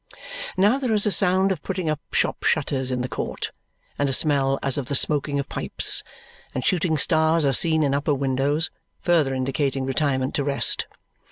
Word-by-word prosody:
Now 210 +8 +3
there 255 -5 0
is 210 - +4
a 210 - +2
sound 190 0 +4
of 175 -6 -3
putting 185 -1 -3
up 155 -1 -1
shop - - 0
shutters 135 -3 0
in 125 -1 -2
the 125 - -2
court - - -4 0.5
and 140 -1 +1
a - - -1
smell 135 -1 +2
as 135 +1 0
of 130 - -5
the 140 - 0
smoking 145 +1 +2
of 140 - -3
pipes; - - -2 0.5
and 130 - -2
shooting 175 -4 +1
stars 160 0 +2
are 135 - +2
seen 160 +3 +3
in 140 -2 +1
upper 145 +1 0
windows, 140 +4 0 0.3
further 155 -6 +2
indicating 135 +1 -1
retirement 135 -1 0
to 145 - 0
rest. 140 0 0
145 Hz, 185 wpm, -23 LUFS, 135-165 Hz, 0.5 s, is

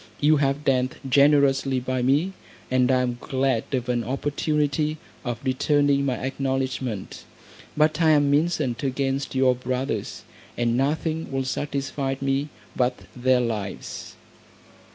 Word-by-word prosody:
You 150 +1 +4
have 140 +1 0
dealt 130 -2 +1
generously 140 -1 +4
by 130 0 -2
me, 145 +9 +2 0.4
and 130 0 +3
I 130 -1 +3
am 120 -1 -2
glad 130 -3 0
of 125 -2 -1
an 120 -1 0
opportunity 150 +3 -1 0.3
of 120 -4 -3
returning 140 +1 +2
my 130 - +1
acknowledgment. 130 -5 -3 0.5
But 155 +1 +3
I 160 - +5
am 145 -2 +4
incensed 150 -6 +1
against 135 0 -1
your 130 -1 +4
brothers, 125 +1 -3 0.3
and 120 -1 +1
nothing 155 +4 -1
will 135 -1 -1
satisfy 135 0 -2
me 135 +2 0 0.3
but 125 0 0
their 125 0 +3
lives." 110 -5 -4
135 Hz, 130 wpm, -24 LUFS, 130-145 Hz, 0.5 s, I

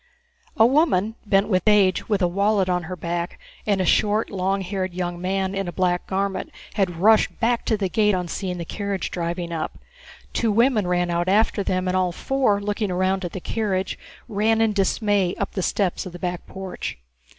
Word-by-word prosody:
A 225 - +7
woman, 235 - +3
bent 195 0 +3
with 185 -4 +2
age, 200 -3 +4
with 205 -3 +1
a - - +4
wallet 200 +2 +2
on 180 -2 0
her 185 +2 -5
back, 170 +1 -4 0.3
and 200 -2 +2
a 185 - +1
short, 210 +5 +2
long 195 0 0
haired, 185 -1 -3
young 175 -1 -3
man 190 +1 -1
in 195 -1 -2
a - - -3
black 180 -1 0
garment 195 0 -2 0.2
had 190 -5 0
rushed 215 +3 +4
back 235 0 +1
to 220 - +1
the 200 -2 0
gate 210 +1 +2
on 180 -1 -2
seeing 180 +1 -3
the 170 - -5
carriage 200 +1 -3
driving 170 0 -3
up. 160 -2 -4 0.6
Two 230 -2 +1
women 225 -2 +3
ran 175 -1 +1
out 170 +1 0
after 210 +1 +3
them, 185 -1 -1
and 185 - 0
all 185 -1 +2
four, 250 +1 +1
looking 205 0 -2
round 185 +1 0
at 175 - -4
the 190 - -4
carriage, 190 -1 -2 0.3
ran 220 +2 +1
in 225 -1 +3
dismay 200 -1 +1
up - - -2
the 190 - -2
steps 185 0 0
of 180 - -9
the - - -7
back 175 0 -4
porch. 190 -1 -6
190 Hz, 200 wpm, -23 LUFS, 180-210 Hz, 0.6 s, A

